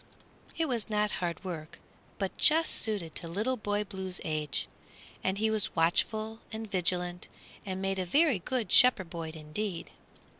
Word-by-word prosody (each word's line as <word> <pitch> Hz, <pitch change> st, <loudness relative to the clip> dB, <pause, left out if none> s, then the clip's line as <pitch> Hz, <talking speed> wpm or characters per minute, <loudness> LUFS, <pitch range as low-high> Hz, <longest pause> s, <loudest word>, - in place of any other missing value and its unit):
It 325 Hz, -1 st, +1 dB
was 235 Hz, -5 st, -1 dB
not 210 Hz, 0 st, +1 dB
hard 170 Hz, -2 st, -3 dB
work, 165 Hz, -4 st, -6 dB, 0.4 s
but 195 Hz, -2 st, -2 dB
just 320 Hz, +1 st, +4 dB
suited 200 Hz, -8 st, -1 dB
to 170 Hz, -, -3 dB
Little 210 Hz, +10 st, -1 dB
Boy 205 Hz, -2 st, -1 dB
Blue's 190 Hz, -2 st, -5 dB
age, 150 Hz, -4 st, -2 dB, 0.6 s
and 190 Hz, +1 st, 0 dB
he 220 Hz, +1 st, +1 dB
was 215 Hz, -2 st, 0 dB
watchful 215 Hz, +7 st, +2 dB
and 220 Hz, 0 st, -5 dB
vigilant 180 Hz, -1 st, +1 dB, 0.4 s
and 190 Hz, 0 st, -3 dB
made 195 Hz, 0 st, 0 dB
a 185 Hz, -, -1 dB
very 285 Hz, -, +4 dB
good 225 Hz, 0 st, -2 dB
shepherd 210 Hz, -9 st, +6 dB
boy 165 Hz, -2 st, -4 dB
indeed. 165 Hz, +4 st, -4 dB
195 Hz, 155 wpm, -30 LUFS, 175-220 Hz, 0.6 s, shepherd